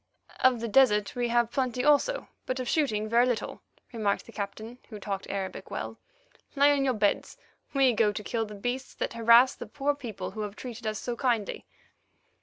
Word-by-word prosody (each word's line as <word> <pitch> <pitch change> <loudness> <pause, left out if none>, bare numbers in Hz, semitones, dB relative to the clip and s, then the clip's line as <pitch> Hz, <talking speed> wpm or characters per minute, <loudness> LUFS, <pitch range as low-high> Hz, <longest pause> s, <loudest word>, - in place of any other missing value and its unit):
"Of 255 -3 +4
the 230 - -2
desert 210 -3 +3
we 245 -1 0
have 235 0 +2
plenty 250 -1 -1
also, 295 +13 +3 0.2
but 255 0 -2
of 255 - -3
shooting 220 -9 +1
very 235 +3 +4
little," 245 -3 -3 0.3
remarked 210 -3 0
the - - -12
Captain, 220 +3 -6
who 215 -3 -8
talked 195 -1 -5
Arabic 195 -1 -4
well. - - -5 0.6
"Lie 285 +1 +5
in 285 -1 +3
your 260 -2 +1
beds; 205 -1 0 0.4
we 265 -2 +5
go 215 -1 +3
to 210 +1 -6
kill 225 +1 -2
the 210 - -9
beasts 245 +6 -4
that - - -3
harass 235 +2 +6
the - - -9
poor 290 0 0
people 240 -8 -6
who 215 +2 -6
have 205 -1 -5
treated 235 -2 -7
us 215 0 -1
so 245 - -4
kindly." 235 -5 -1
235 Hz, 195 wpm, -28 LUFS, 215-255 Hz, 0.6 s, harass